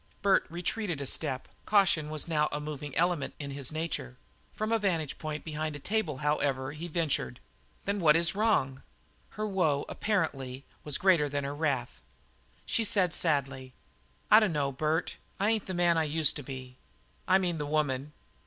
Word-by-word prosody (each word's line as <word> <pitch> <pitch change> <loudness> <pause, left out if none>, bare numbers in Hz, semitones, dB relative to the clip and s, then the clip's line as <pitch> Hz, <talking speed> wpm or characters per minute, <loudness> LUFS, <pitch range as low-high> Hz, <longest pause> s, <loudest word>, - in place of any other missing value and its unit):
Bert 195 -1 +4
retreated 175 0 -2
a 140 - -4
step; 130 -1 -1 0.2
caution 190 -7 +4
was 155 +1 -2
a 150 -2 0
moving 150 -2 -6
element 170 -3 +1
in 140 -2 -5
his 135 -1 -2
nature. 155 - -4 0.3
From 215 +1 -3
a 225 - +3
vantage 170 -8 -1
point 155 -1 -4
behind 155 -1 -3
a - - -6
table, 185 -5 -1
however, 140 -2 0
he 155 +3 -6
ventured: 150 - -1 0.5
"Then 200 +1 -1
what 155 -3 +5
is 170 0 +4
wrong?" 190 -11 +1 0.6
Her 215 - -1
woe, 170 -9 +1
apparently, 140 -10 -2 0.2
was 150 -2 0
greater 170 -6 +4
than 145 0 -2
her 140 +1 -3
wrath. 135 - -2 0.6
She 230 - +1
said 190 -5 +2
sadly: 135 -6 0 0.6
"I 215 - +10
dunno, 150 -10 +1
Bert. 155 +4 -1 0.2
I 205 +3 +3
ain't 220 -2 -1
the 185 - -3
man 175 -1 +3
I 160 - +1
used 155 -1 +2
to - - -5
be 130 -2 -8 0.5
I 190 - +6
mean, 175 -4 -1
the 150 - -3
woman." 145 -1 -1
155 Hz, 170 wpm, -30 LUFS, 140-175 Hz, 0.6 s, I